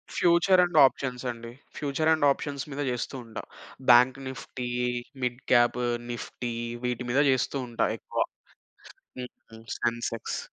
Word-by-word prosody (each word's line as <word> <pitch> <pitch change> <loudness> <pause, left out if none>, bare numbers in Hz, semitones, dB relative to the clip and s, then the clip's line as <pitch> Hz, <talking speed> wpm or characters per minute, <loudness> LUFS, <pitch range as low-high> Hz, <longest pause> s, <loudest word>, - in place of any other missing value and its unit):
Future 180 +2 +5
and 175 -3 0
options 130 -1 -1
అండి. 115 0 -9 0.3
Future 150 +2 0
and 155 -2 +2
options 140 0 -3
మీద 145 +2 -3
జేస్తూ 125 +2 -3
ఉంటా. 115 - -7 0.5
Bank 125 +2 +6
Nifty, 125 -1 -6 0.5
mid 125 0 -1
cab 120 0 +4 0.3
Nifty 120 0 -5 0.3
వీటి 125 0 -2
మీద 140 +3 +4
జేస్తూ 130 +2 0
ఉంటా 115 - 0
ఎక్కువ. - - -1 0.9
హ్మ్, 125 0 -6 0.2
హ్మ్. 110 0 -13
సెన్సెక్స్. 115 -1 -2
125 Hz, 130 wpm, -27 LUFS, 120-140 Hz, 0.9 s, Bank